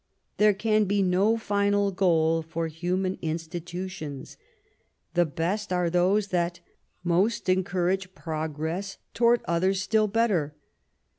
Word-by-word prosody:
There 210 -1 +4
can 215 +1 +2
be 200 0 +1
no 195 +5 +3
final 205 -2 +1
goal 165 -4 +2
for 165 +1 -4
human 180 +4 -2
institutions; 165 -2 -5 0.8
the 175 -1 +3
best 180 +7 -2
are 180 -2 +1
those 190 +4 +2
that 175 -1 -1 0.4
most 185 +6 +1
encourage 185 0 0
progress 160 +4 -4 0.2
toward 235 0 +3
others 185 +3 +1
still 215 +3 +2
better. 195 -9 +1
185 Hz, 115 wpm, -26 LUFS, 170-200 Hz, 0.8 s, There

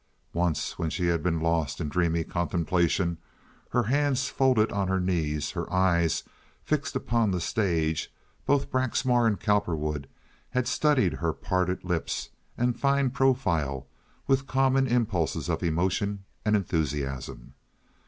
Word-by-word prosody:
Once 85 -2 -1
when 80 - 0
she 90 +2 -2
had 85 -2 +1
been 85 -1 0
lost 80 -3 0
in 80 - -2
dreamy 85 +1 +1
contemplation, 85 0 0 0.5
her 120 - +2
hands 135 +2 +1
folded 130 -5 +3
on 100 -2 0
her 95 0 +1
knees, 80 -5 -1
her - - -5
eyes 85 -3 +2 0.4
fixed 145 -2 -1
on 115 -3 +3
the 90 -2 0
stage, 85 -6 0 0.4
both 145 -1 +2
Braxmar 130 -2 +2
and 105 -3 0
Cowperwood 75 -9 0 0.4
had 125 -1 0
studied 145 - +2
her 85 -1 -1
parted 90 -1 -1
lips 90 -3 -2 0.3
and 120 0 0
fine 140 -2 +2
profile 95 - +1 0.4
with 135 0 +1
common 135 0 +3
impulses 110 - 0
of - - -1
emotion 95 +4 0 0.2
and 105 0 +2
enthusiasm. 70 -9 -2
95 Hz, 135 wpm, -27 LUFS, 80-125 Hz, 0.5 s, folded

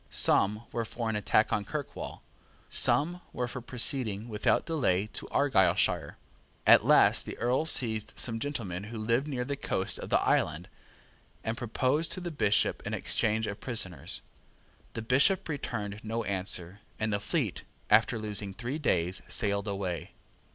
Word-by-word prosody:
Some 105 +3 +3
were 115 - -2
for 115 0 -3
an - - -3
attack 105 +1 +2
on 105 - 0
Kirkwall. 145 +8 -6 0.5
Some 175 +5 +3
were 125 - -2
for 125 +1 -6
proceeding 120 -3 0
without 105 -1 +1
delay 120 - +1
to - - -3
Argyleshire. 115 -11 +2 0.5
At - - +7
last - - +4
the - - -6
Earl 125 +6 +1
seized 110 -7 +2
some 115 -2 +1
gentlemen 105 -9 -4
who 115 +1 -7
lived 115 +6 0
near 125 -4 -3
the 140 - -3
coast 95 -8 -1
of - - -7
the - - +3
island, 80 +3 0 0.8
and 110 - -2
proposed 130 +6 0
to - - -3
the 175 -1 -5
Bishop 105 -9 +1
an - - -2
exchange 110 +1 0
of 100 -1 -6
prisoners. 100 -9 -2 0.7
The 115 - -5
Bishop 140 - +3
returned 105 -9 -4
no 115 +1 -3
answer; 95 -1 -2 0.2
and 110 -1 -1
the 100 - 0
fleet, - - -2 0.3
after 110 +2 +4
losing 105 -2 -1
three 125 +7 -4
days, 90 - 0
sailed 100 -1 0
away. 95 -4 -4
110 Hz, 155 wpm, -29 LUFS, 100-130 Hz, 0.8 s, At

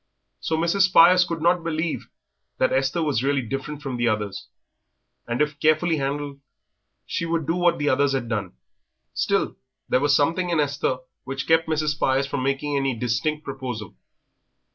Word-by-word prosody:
So 160 - -1
Mrs. 170 +4 +1
Spires 180 +1 +7
could 165 -3 -4
not 175 0 +3
believe 165 0 -2 0.5
that 130 - +2
Esther 135 +5 +1
was 145 -7 0
really 140 -1 +1
different 135 +5 -5
from 135 -3 -3
the 120 0 +1
others, 105 -3 -2 0.8
and 120 +5 +1
if 150 -1 -5
carefully 155 +2 +2
handled 140 0 -3 0.7
she 170 - -3
would 165 -2 -1
do 165 +3 0
what 175 -1 +2
the 145 - -2
others 140 +1 +2
had 130 -3 -2
done. 105 -5 -3 0.6
Still, - - 0 0.3
there 125 - +3
was 145 0 +3
something 165 +5 +1
in 170 -2 +1
Esther 145 -3 0 0.3
which 135 0 -4
kept 160 0 +3
Mrs. 155 -1 +1
Spires 135 -2 +1
from 140 -1 -3
making 140 +2 -1
any 135 -2 0
distinct 125 +7 -1
proposal. 130 - -6
145 Hz, 165 wpm, -24 LUFS, 130-160 Hz, 0.8 s, Spires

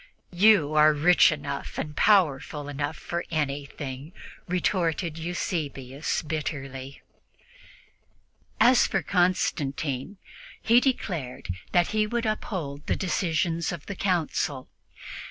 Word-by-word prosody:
"You 175 -5 +5
are 155 0 +6
rich 170 +5 +5
enough 140 -2 -5
and 150 -1 -4
powerful 150 -8 +2
enough 145 +2 -3
for 170 0 -4
anything," 145 -1 -4 0.3
retorted 170 -3 0
Eusebius 150 -5 -3
bitterly. 140 -3 -5 1.6
As 240 +2 +6
for - - -1
Constantine, 155 -3 0 0.4
he 230 +2 +5
declared 175 - -2 0.2
that 175 -1 +3
he 215 0 +1
would 235 +1 -2
uphold 170 -9 -3
the - - +1
decisions 170 -3 0
of 170 -4 -7
the 200 - -6
Council. 165 -8 -1
160 Hz, 100 wpm, -26 LUFS, 145-185 Hz, 1.6 s, are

